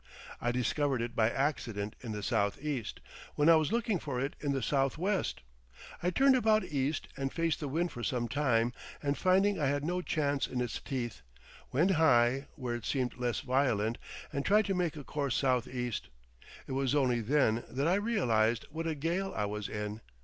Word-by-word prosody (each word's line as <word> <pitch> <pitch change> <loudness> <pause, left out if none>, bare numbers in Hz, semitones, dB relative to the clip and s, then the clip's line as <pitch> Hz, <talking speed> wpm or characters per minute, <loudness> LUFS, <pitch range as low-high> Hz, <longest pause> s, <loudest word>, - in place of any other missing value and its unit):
I 120 - +1
discovered 130 +2 0
it 120 0 -5
by 110 -1 +3
accident 115 -7 -2
in 115 - -5
the 105 -1 -4
southeast, 115 +6 -1 0.3
when 150 +2 +4
I 165 - +9
was 155 -2 +2
looking 225 -5 +1
for 140 -5 -3
it 135 +2 -2
in 145 - -1
the 135 -3 -1
southwest. 150 - 0 0.6
I 175 - +1
turned 265 +9 +5
about 220 -3 +3
east 140 +1 -1
and 135 0 -2
faced 165 -2 0
the 145 - -3
wind 170 +5 -1
for 120 - -7
some 120 0 -1
time, 120 -2 +1 0.3
and 140 0 +1
finding 190 +2 +3
I 145 - +2
had 145 +1 0
no 180 +2 0
chance 145 -5 0
in 125 - -3
its 120 -2 -2
teeth, 120 -4 -4 0.5
went 165 +9 +3
high, 135 -5 +4
where 125 -3 -3
it 120 -2 -5
seemed 130 -3 -1
less 120 -2 -1
violent, 125 -4 +1 0.3
and 140 - -1
tried 210 +5 +4
to 195 - 0
make 175 -4 0
a 145 - -7
course 140 +1 -2
southeast. 125 - -1 0.6
It - - -8
was 135 +1 +1
only 125 -4 +2
then 120 -2 +2
that 135 +5 -1
I 175 - +4
realised 120 - +2
what 165 +2 -3
a 160 - -1
gale 170 +6 -1
I 105 - +1
was 105 0 -4
in. 105 +1 -4
135 Hz, 190 wpm, -31 LUFS, 120-160 Hz, 0.6 s, I